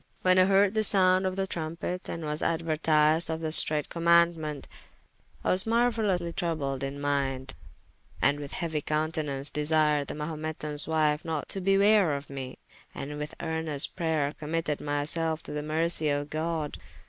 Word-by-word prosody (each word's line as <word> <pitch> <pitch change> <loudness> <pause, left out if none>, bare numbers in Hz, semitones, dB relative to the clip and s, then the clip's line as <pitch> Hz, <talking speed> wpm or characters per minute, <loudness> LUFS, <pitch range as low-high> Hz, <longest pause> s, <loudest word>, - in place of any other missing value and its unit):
When 185 0 +4
I 185 - +6
hearde 195 +1 +3
the 220 -1 +1
sounde 190 -2 +4
of 185 - -3
the 195 0 -1
trumpet, 170 +1 -5
and 165 -1 -5
was 150 0 -2
aduertised 160 -1 +1
of 160 0 -2
the 160 -1 -3
streight 150 -2 +7
commaundement, 170 -3 +1 0.8
I - - +1
was 185 +1 +2
marueylously 220 -7 0
troubled 145 -7 -2
in 135 +1 -5
minde, 135 -2 -2 0.7
and 145 +1 +2
with 145 -1 -8
heauy 160 -4 -3
countenaunce 150 -3 -2
desired 150 -1 +1
the - - -6
Mahumetans 150 -1 -1
wife 155 -2 +1
not 160 -3 -4
to 195 - -3
bewraye 195 -6 +3
me, 135 -1 -7 0.4
and 150 +2 -6
with 150 0 -6
earnest 160 -3 0
prayer 155 -4 -1
committed 155 -1 -3
myselfe 155 +2 -2
to - - -8
the 150 0 -3
mercie 155 +1 -1
of 145 0 -2
God. 155 -1 -3
155 Hz, 155 wpm, -27 LUFS, 150-170 Hz, 0.8 s, streight